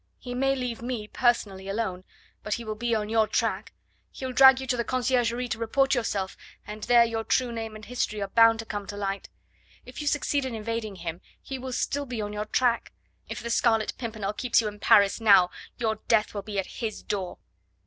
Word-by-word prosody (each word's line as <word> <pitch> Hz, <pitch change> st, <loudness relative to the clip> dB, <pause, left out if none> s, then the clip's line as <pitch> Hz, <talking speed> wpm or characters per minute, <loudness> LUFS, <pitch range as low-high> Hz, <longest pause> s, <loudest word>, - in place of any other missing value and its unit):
He 245 Hz, -, -7 dB
may 270 Hz, +2 st, +1 dB
leave 250 Hz, -3 st, -4 dB
me, 235 Hz, -3 st, -4 dB
personally, 210 Hz, -6 st, 0 dB
alone; 195 Hz, -3 st, -3 dB, 0.4 s
but 210 Hz, -, -2 dB
he 235 Hz, -, -6 dB
will 215 Hz, -, -3 dB
be 230 Hz, +2 st, -1 dB
on 210 Hz, -1 st, -1 dB
your 220 Hz, 0 st, +2 dB
track; -, -, -1 dB, 0.4 s
he'll 260 Hz, -1 st, -6 dB
drag 265 Hz, 0 st, +7 dB
you 265 Hz, -, -5 dB
to 255 Hz, -, 0 dB
the 235 Hz, -, -1 dB
Conciergerie 245 Hz, 0 st, 0 dB
to 225 Hz, -, -3 dB
report 270 Hz, +4 st, +2 dB
yourself, 200 Hz, -6 st, -1 dB, 0.3 s
and 210 Hz, +1 st, -8 dB
there 240 Hz, -1 st, +6 dB
your 225 Hz, -1 st, -2 dB
true 250 Hz, +1 st, +1 dB
name 225 Hz, -1 st, -5 dB
and 215 Hz, 0 st, -10 dB
history 235 Hz, -3 st, -2 dB
are 200 Hz, -, -2 dB
bound 230 Hz, +2 st, +5 dB
to 225 Hz, -, -6 dB
come 205 Hz, -2 st, -5 dB
to 205 Hz, -, -6 dB
light. 195 Hz, -1 st, -3 dB, 0.6 s
If 250 Hz, +4 st, -8 dB
you 295 Hz, -, -4 dB
succeed 290 Hz, -1 st, +1 dB
in 260 Hz, -3 st, -4 dB
evading 220 Hz, -1 st, -4 dB
him, 170 Hz, -1 st, -6 dB, 0.2 s
he 265 Hz, -1 st, -6 dB
will 260 Hz, 0 st, -6 dB
still 280 Hz, +3 st, -1 dB
be 245 Hz, -3 st, -4 dB
on 210 Hz, -1 st, -3 dB
your 210 Hz, 0 st, -3 dB
track. 235 Hz, +2 st, +1 dB, 0.4 s
If -, -, -6 dB
the 235 Hz, -, -3 dB
Scarlet 225 Hz, -2 st, +2 dB
Pimpernel 220 Hz, -4 st, -3 dB
keeps 245 Hz, +2 st, +2 dB
you 225 Hz, -, 0 dB
in 210 Hz, 0 st, -7 dB
Paris 200 Hz, +1 st, +4 dB
now, 195 Hz, -5 st, +6 dB, 0.3 s
your 220 Hz, -2 st, 0 dB
death 220 Hz, -2 st, +2 dB
will 205 Hz, -, -3 dB
be 205 Hz, 0 st, -6 dB
at 195 Hz, -, -4 dB
his 220 Hz, -2 st, -3 dB
door." 190 Hz, -3 st, -3 dB
225 Hz, 215 wpm, -27 LUFS, 210-245 Hz, 0.6 s, drag